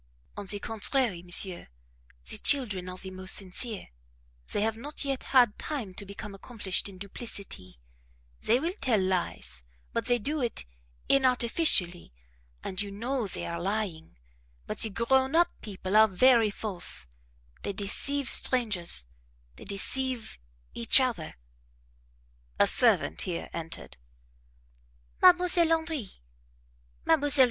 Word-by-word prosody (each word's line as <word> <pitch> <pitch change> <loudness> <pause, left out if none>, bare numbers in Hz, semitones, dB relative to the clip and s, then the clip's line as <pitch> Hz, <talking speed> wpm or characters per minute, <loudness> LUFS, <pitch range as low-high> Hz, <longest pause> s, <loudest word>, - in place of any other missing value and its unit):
"On 205 - -7
the 205 - 0
contrary, 225 -2 0
monsieur 175 +1 0 0.6
the - - +1
children 205 -10 +1
are 185 - -8
the 190 +1 -3
most 185 0 0
sincere; 200 +3 -4 0.6
they - - -1
have 220 +1 0
not 285 +5 -6
yet 270 -2 -3
had 245 -5 +3
time 250 -11 -5
to 200 +1 -8
become 200 +1 -8
accomplished 200 -2 -2
in 190 - -13
duplicity; 195 - -7 0.6
they 235 +3 +2
will 335 +5 -2
tell 240 -6 +2
lies, 185 - -2 0.3
but - - -2
they 245 - +4
do 290 +7 -2
it 235 - -2 0.4
inartificially, 245 - +3 0.5
and 185 0 -2
you 205 - -1
know 235 +3 -3
they - - -2
are 170 0 -5
lying; 190 - -4 0.5
but - - -5
the 225 - +6
grown 265 +7 +1
up 345 +1 +4
people 195 -1 -5
are 220 0 +7
very 230 +3 +4
false; 190 - -1 0.6
they - - -3
deceive 240 +8 -1
strangers, 210 - +4 0.5
they - - -12
deceive 235 - -1 0.3
each 115 - +4
other 235 - -2 0.6
" - - -35
A - - +6
servant 80 - +2
here 175 -2 -5
entered: 165 - -6 1.2
"Mdlle. 360 -1 +6 0.2
Henri 320 - -1 1.0
Mdlle. 290 -3 +5
210 Hz, 130 wpm, -28 LUFS, 185-255 Hz, 1.2 s, are